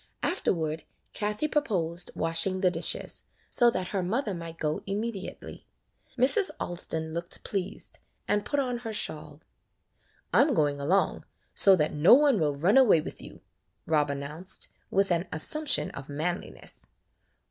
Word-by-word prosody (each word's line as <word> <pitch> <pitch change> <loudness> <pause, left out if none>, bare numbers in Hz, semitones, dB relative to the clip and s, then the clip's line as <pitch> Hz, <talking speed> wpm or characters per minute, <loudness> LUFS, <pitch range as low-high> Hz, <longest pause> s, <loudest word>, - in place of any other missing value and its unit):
Afterward 160 - -1 0.3
Kathie 210 +7 -2
proposed 180 - -1
washing 165 +3 0
the 185 -2 +3
dishes, - - -2 0.3
so 240 -1 +5
that 185 -6 -3
her 195 - -1
mother 215 +4 -1
might 165 -1 -8
go 155 -1 -2
immediately. 205 0 -6 0.5
Mrs. 280 - +4
Alston 160 -2 -2
looked 170 +1 -3
pleased, 195 0 -5 0.3
'and 205 0 +1
put 285 - -1
on 250 -3 -2
her 225 -2 -6
shawl. 155 -6 -3 0.9
"I - - +6
'm 280 -2 +2
going 145 -4 +1
along, 180 +8 0 0.3
so 195 -1 +9
that 155 -3 0
no 150 +10 +7
one 280 -5 +3
will 150 -2 0
run 180 - +3
away 240 -11 +6
with - - -7
you," - - -12 0.4
Rob 150 -2 +1
announced, 145 +6 -1 0.2
'with 195 -1 +1
an 170 +2 0
assumption 290 - 0
of 135 0 -10
manliness. 160 +5 -4
180 Hz, 145 wpm, -27 LUFS, 160-220 Hz, 0.9 s, so